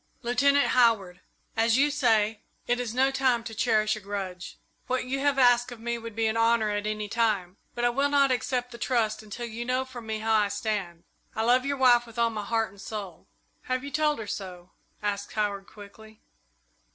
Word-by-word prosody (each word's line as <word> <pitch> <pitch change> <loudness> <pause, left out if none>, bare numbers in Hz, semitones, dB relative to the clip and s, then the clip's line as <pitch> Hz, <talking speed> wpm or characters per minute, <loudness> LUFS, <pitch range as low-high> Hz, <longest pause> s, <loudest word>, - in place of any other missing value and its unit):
"Lieutenant 280 +4 +3
Howard, 205 -8 +2 0.3
as 225 +1 +3
you 290 +2 +3
say, 220 -6 +2 0.2
it 245 0 0
is 245 -3 -3
no 265 +1 +3
time 260 -3 +1
to 230 -1 -7
cherish 215 -2 +2
a - - -7
grudge. 190 -3 -6 0.3
What 255 0 -1
you 265 +2 -2
have 280 0 +1
asked 245 -1 +4
of 240 - -9
me 235 +1 -3
would 230 -2 -8
be 225 0 0
an 220 0 +1
honour 230 -1 +2
at 205 0 -2
any 215 0 -3
time, 205 -5 0 0.2
but 240 - 0
I - - +4
will 275 +4 +1
not 280 -2 +3
accept 250 0 -1
the 235 - -10
trust 225 -4 0
until 220 +3 -7
you 235 +1 -5
know 255 +2 -1
from 245 -3 -10
me 220 0 -2
how 220 +1 0
I 210 -1 +4
stand. 200 -4 -3 0.3
I 220 - 0
love 250 +3 +3
your 280 0 -1
wife 245 -2 +5
with 230 +1 -14
all 235 -1 +2
my 215 -2 -4
heart 225 0 -1
and 200 0 -15
soul." 195 -6 -7 0.4
"Have 255 0 -2
you 280 - -6
told 300 +1 +1
her 220 - -6
so?" 185 -3 -7 0.3
asked 205 -1 -3
Howard, 205 -2 -2
quickly. 215 +1 -14
230 Hz, 210 wpm, -27 LUFS, 210-250 Hz, 0.4 s, wife